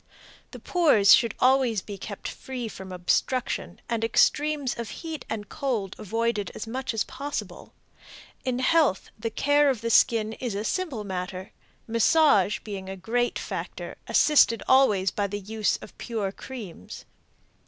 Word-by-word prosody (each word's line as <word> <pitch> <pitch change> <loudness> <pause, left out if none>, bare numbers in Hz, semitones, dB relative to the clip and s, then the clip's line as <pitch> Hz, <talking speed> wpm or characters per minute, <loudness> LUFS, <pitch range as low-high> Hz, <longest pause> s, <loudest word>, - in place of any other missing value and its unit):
The - - -10
pores 285 - +5
should 230 -3 +3
always 255 -5 +3
be 205 - -7
kept 200 +1 -7
free 255 -3 -6
from 190 -3 -9
obstruction 185 +8 -1
and 230 -1 -2
extremes 290 +4 +2
of 230 -3 -4 0.2
heat 320 -2 -5
and 210 -2 -4
cold 240 -10 -3
avoided 225 -1 -1
as - - -5
much 250 +1 -4
as 220 - +1
possible. 285 +2 -6 0.7
In 255 -1 -1
health, 260 - +2
the 225 +1 -2
care 290 +5 +3
of 250 -6 -1
the 230 0 -1
skin 220 -1 +4
is 235 -3 -4
a 205 - -2
simple 290 - -2
matter, 185 -1 -5 0.4
massage 230 - +4
being 195 -3 -7
a 190 - -6
great 240 +6 -1
factor, - - -6
assisted 280 -7 +4
always 210 -8 +4
by 205 -1 -1
the 205 +1 -4
use 215 +1 -1
of - - -12
pure 215 -5 -3
creams. 200 - -9
225 Hz, 150 wpm, -26 LUFS, 200-260 Hz, 0.7 s, pores